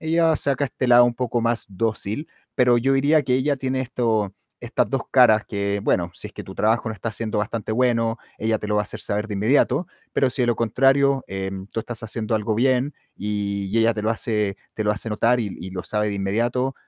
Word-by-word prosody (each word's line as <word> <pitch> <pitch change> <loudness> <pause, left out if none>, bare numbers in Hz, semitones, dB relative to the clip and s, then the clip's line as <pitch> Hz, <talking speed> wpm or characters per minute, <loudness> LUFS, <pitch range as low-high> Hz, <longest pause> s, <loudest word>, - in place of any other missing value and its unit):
ella 160 0 +2
saca 140 0 0
este 130 -1 -3
lado 120 0 +8
un 120 -1 +1
poco 120 -1 -1
más 115 0 0
dócil, 110 - -2 0.3
pero 125 -2 +4
yo 135 +3 +2
diría 145 +3 +3
que 125 -2 +1
ella 140 +3 +2
tiene 130 0 -2
esto 110 -6 -1 0.3
estas - - -1
2 - - 0
caras 110 0 +6
que, 100 -1 -2
bueno, 85 -1 +1
si - - -7
es - - -18
que - - -8
tu - - -10
trabajo 110 +2 +1
no 110 - -4
está 110 +2 -4
siendo 110 -1 -3
bastante 110 0 -3
bueno, 115 -1 +1 0.2
ella 110 0 0
te - - -6
lo 105 - -1
va 105 - +3
a - - -6
hacer - - -6
saber 105 +2 0
de 105 - -4
inmediato, 130 - +2 0.3
pero 130 -2 +2
si 125 0 -1
es 120 - +1
lo 120 - +2
contrario, 135 +4 +3
em, 95 0 -5
tú 115 - -5
estás 115 0 -6
haciendo 110 0 -2
algo 110 0 0
bien, 130 +3 +2 0.2
y 100 -1 -3
ella 115 0 +3
te 105 - -4
lo 110 - +1
hace 105 -3 -1 0.2
te 110 - -2
lo 105 - +2
hace 105 +2 -2
notar 115 +3 +2
y - - -1 0.2
y 95 +2 -7
lo 95 -1 -6
sabe 105 0 0
de 100 - -3
inmediato, 120 +7 0
115 Hz, 230 wpm, -23 LUFS, 105-130 Hz, 0.3 s, lado